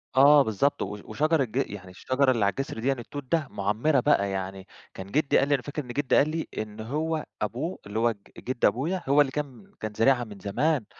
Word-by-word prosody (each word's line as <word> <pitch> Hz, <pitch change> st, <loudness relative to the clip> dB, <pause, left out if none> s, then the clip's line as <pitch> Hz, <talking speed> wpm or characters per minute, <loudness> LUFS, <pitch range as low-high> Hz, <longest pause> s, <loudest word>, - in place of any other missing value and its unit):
آه، 140 Hz, +2 st, +7 dB
بالضبط 140 Hz, +6 st, 0 dB
و 105 Hz, -, -3 dB
وشجر 155 Hz, -1 st, +1 dB
ج 125 Hz, +1 st, -5 dB
يعني 95 Hz, -2 st, -9 dB
الشجرة 130 Hz, +8 st, +1 dB
اللي 115 Hz, -5 st, +1 dB
على 100 Hz, -, +4 dB
الجسر 135 Hz, -2 st, -5 dB
ديًا 135 Hz, +4 st, +1 dB
التوت 135 Hz, +3 st, -7 dB
ده 160 Hz, -4 st, +1 dB
مُعمرة 110 Hz, +9 st, +1 dB
بقى 120 Hz, -7 st, +2 dB
يعني 95 Hz, 0 st, -5 dB, 0.3 s
كان 95 Hz, +1 st, -9 dB
جِدي 150 Hz, +2 st, +2 dB
قال 135 Hz, -, +2 dB
لي -, -, +4 dB
أنا 135 Hz, -, -3 dB
فاكر 145 Hz, +2 st, -4 dB
إن -, -, -15 dB
جِدي 130 Hz, +3 st, 0 dB
قال 145 Hz, -, +4 dB
لي، 160 Hz, +1 st, -3 dB
إن 110 Hz, 0 st, -5 dB
هو 155 Hz, +7 st, -2 dB, 0.2 s
أبوه 125 Hz, -, -3 dB
اللي 105 Hz, +2 st, -3 dB
هو 120 Hz, 0 st, +3 dB
ج 110 Hz, -, -9 dB, 0.2 s
جِد 125 Hz, -1 st, -1 dB
أبويا 165 Hz, +9 st, 0 dB
هو 145 Hz, +2 st, +6 dB
اللي 140 Hz, -2 st, +1 dB
كان 150 Hz, +7 st, -6 dB
كان 110 Hz, -1 st, -5 dB
زارعها 125 Hz, +3 st, +3 dB
من 105 Hz, -4 st, -10 dB
زمان، 125 Hz, +6 st, 0 dB
130 Hz, 225 wpm, -27 LUFS, 110-145 Hz, 0.3 s, آه